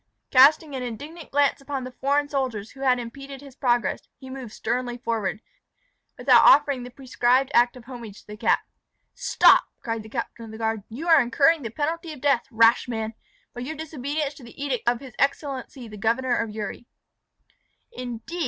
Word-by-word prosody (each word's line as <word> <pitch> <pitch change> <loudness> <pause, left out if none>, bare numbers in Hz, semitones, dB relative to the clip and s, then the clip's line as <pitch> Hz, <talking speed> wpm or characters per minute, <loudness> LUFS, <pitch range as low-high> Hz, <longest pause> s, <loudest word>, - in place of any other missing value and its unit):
Casting 290 +3 +6
an 260 - -3
indignant 290 +8 -7
glance 285 0 +2
upon 275 -1 -4
the 255 - -7
foreign 285 +3 0
soldiers 255 -7 -3
who 270 - -16
had 260 -2 +3
impeded 275 +3 -8
his 275 -2 -13
progress, 240 -3 +1 0.2
he 265 -1 -11
moved 260 -4 -7
sternly 245 +2 -3
forward, 225 -4 -2 0.8
without - - +6
offering 280 -2 +5
the 245 - -8
prescribed 255 +1 +1
act 240 +1 +4
of 245 - -12
homage 235 -5 -9
to - - -28
the 210 - -9
cap. - - +2 0.5
"Stop!" - - +5
cried 225 -2 -3
the 215 - -12
captain 235 0 -5
of - - -11
the 220 - -9
guard; 220 -1 -1
"you 275 +10 -6
are 325 -3 +7
incurring 275 +7 +3
the 230 - -4
penalty 320 - -3
of 295 - -11
death, 275 -3 +1
rash 230 0 +4
man, 220 -2 -3 0.4
by 245 - -7
your 290 +6 -5
disobedience 295 -1 -3
to 275 - -15
the 235 - -14
edict 275 -5 -3
of 240 -1 -1
his 260 -4 -11
excellency 275 -2 -2
the 210 -1 -10
Governor 240 +4 +1
of 225 - -1
Uri." 215 +2 -6 1.0
"Indeed!" 250 - -7
255 Hz, 185 wpm, -24 LUFS, 230-280 Hz, 1.0 s, are